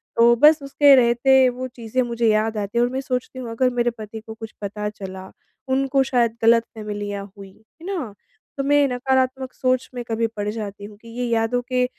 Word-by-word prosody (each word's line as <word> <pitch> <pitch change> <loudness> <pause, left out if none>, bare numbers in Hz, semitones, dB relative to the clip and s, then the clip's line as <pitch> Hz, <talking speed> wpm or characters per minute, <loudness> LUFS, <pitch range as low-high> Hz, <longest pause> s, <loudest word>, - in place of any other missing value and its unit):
तो 235 +1 +5
बस 300 +4 +5
उसके 275 0 +5
रहते 255 +2 +4
वो 255 +1 -5
चीज़ें 240 0 -3
मुझे 235 -1 0
याद 215 0 +1
आती 205 +2 -3
हैं 240 - +4
और 245 - -3
मैं 265 +1 -2
सोचती 255 0 -4
हूँ, 245 -2 -6
अगर 255 +3 +1
मेरे 240 0 +1
पति 220 0 -8
को 220 0 -10
कुछ 220 0 -10
पता 210 +1 -4
चला, 190 -2 -9 0.4
उनको 270 +1 +2
शायद 240 -3 +1
गलतफ़हमियाँ 210 -3 0
हुईं, 195 -1 -12 0.3
है - - -11
ना? 335 - -4 0.4
तो 275 - -1
मैं 285 0 +3
नकारात्मक 260 +1 -1
सोच 255 0 0
में 245 - -4
कभी 230 0 0
पड़ 205 0 -2
जाती 205 -2 -6
हूँ 205 0 -12
कि 230 - -15
ये 250 - 0
यादों 230 +2 +1
के 250 -1 +1
235 Hz, 200 wpm, -22 LUFS, 215-260 Hz, 0.4 s, तो